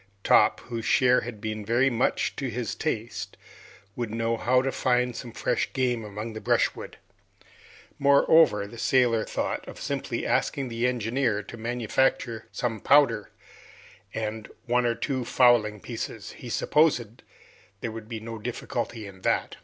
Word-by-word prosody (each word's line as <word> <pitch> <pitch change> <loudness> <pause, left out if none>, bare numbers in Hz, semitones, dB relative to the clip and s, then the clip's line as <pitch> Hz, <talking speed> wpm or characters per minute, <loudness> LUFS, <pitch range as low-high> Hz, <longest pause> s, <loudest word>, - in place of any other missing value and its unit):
Top, - - +4
whose 115 -2 -5
share 125 +1 +4
had 120 -3 -7
been 110 0 -4
very 120 +5 +2
much 120 +2 0
to 135 -2 -3
his 115 -2 -3
taste, 120 -7 -4 0.6
would 120 -2 -3
know 115 +1 -1
how 125 +2 +2
to 135 - 0
find 125 -2 +1
some 120 0 -7
fresh - - -1
game 125 -3 0
among 105 +2 -6
the 110 - -7
brushwood. - - 0 1.0
Moreover, 140 -4 +5
the 115 +3 -10
sailor 120 -4 +3
thought - - -3
of - - -9
simply - - -3
asking 135 -3 0
the 115 +1 0
engineer 120 -2 0
to 105 - -10
manufacture 120 0 -1
some 115 -3 -2
powder 115 -5 +4 0.8
and 110 0 -4 0.2
one 125 0 +2
or 115 - +1
two 130 +2 -2
fowling 120 -4 +3
pieces; 115 -1 -6
he 125 - -10
supposed 125 -5 +1 0.6
there 115 - -3
would 110 0 -9
be 115 -2 -4
no 115 0 -7
difficulty 120 0 -4
in 95 -2 -12
that. - - 0
115 Hz, 150 wpm, -26 LUFS, 110-125 Hz, 1.0 s, Moreover